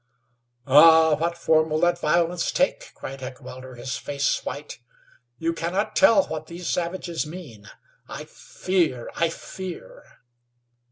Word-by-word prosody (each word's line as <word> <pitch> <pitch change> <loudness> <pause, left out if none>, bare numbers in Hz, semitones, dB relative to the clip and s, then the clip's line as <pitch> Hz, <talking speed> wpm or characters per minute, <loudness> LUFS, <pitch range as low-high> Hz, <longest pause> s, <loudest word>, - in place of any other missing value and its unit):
"Ah! 160 +3 +7
What 170 +3 -1
form 160 -1 +2
will 155 0 0
that 175 0 +2
violence 170 +2 +1
take?" - - 0
cried 135 0 -8
Heckewelder, 130 0 -9
his 125 +2 -4
face 140 -1 -1
white. 145 -3 -7 0.6
"You 165 +3 -1
cannot 175 +5 -2
tell 205 -4 +6
what 155 0 -6
these 170 +1 -7
savages 170 -2 -2
mean. 140 - -10 0.4
I - - -7
fear! 165 -10 -2
I 170 - +1
fear!" 190 - -8
165 Hz, 125 wpm, -24 LUFS, 145-175 Hz, 0.6 s, Ah